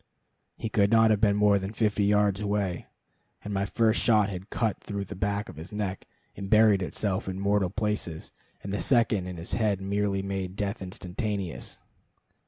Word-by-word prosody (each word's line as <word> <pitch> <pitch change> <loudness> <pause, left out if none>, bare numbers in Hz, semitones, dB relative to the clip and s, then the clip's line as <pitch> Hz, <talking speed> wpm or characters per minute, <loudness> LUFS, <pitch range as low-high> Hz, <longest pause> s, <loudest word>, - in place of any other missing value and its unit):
He - - -3
could 100 -2 +2
not 110 0 +5
have 105 -2 +2
been 100 -2 +4
more 105 -1 +4
than 95 +2 -5
fifty 105 -2 +1
yards 105 -1 +2
away, 100 -4 -1 0.6
and 105 - -5
my 100 +1 0
first 110 +4 +2
shot 105 -3 +4
had 95 +1 -7
cut 110 -4 -1
through 100 -1 -5
the - - -8
back 100 +3 -1
of - - -11
his 80 +6 -9
neck 100 -2 -4 0.3
and 95 - -6
buried 110 -2 +5
itself 95 +1 -2
in 95 0 -4
mortal 100 -1 +2
places, 105 -6 -3 0.3
and 100 - -5
the 100 - -1
second 110 -4 +2
in 90 -1 -6
his 85 +2 -5
head 105 -4 +1
merely 100 0 -1
made 95 -1 -4
death 100 +2 -3
instantaneous. 95 +1 -4
100 Hz, 185 wpm, -27 LUFS, 95-105 Hz, 0.6 s, not